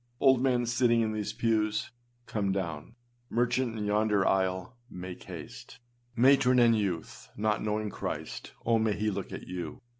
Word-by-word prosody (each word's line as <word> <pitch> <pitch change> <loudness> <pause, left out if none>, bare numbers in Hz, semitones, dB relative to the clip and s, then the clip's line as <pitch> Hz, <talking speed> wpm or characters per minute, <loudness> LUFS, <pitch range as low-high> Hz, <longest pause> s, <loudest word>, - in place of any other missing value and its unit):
Old 130 -2 +5
man, 125 -2 +2
sitting 120 0 +3
in 110 -1 0
these 105 -1 -3
pews, 110 -1 0 0.3
come 100 -3 -1
down. 90 0 -4 0.3
Merchant 120 0 0
in 105 - -2
yonder 105 -1 +2
aisle, 95 +3 0
make 90 -2 -8
haste. - - -9 0.4
Matron 130 0 +5
and 120 -2 +6
youth, 95 -7 -3
not 105 0 +1
knowing 105 0 -1
Christ, - - -5
oh, 115 -1 +3
may 110 -1 +2
he 105 +1 -1
look - - -5
at - - -7
you. 90 -3 -5
110 Hz, 155 wpm, -29 LUFS, 100-120 Hz, 0.4 s, and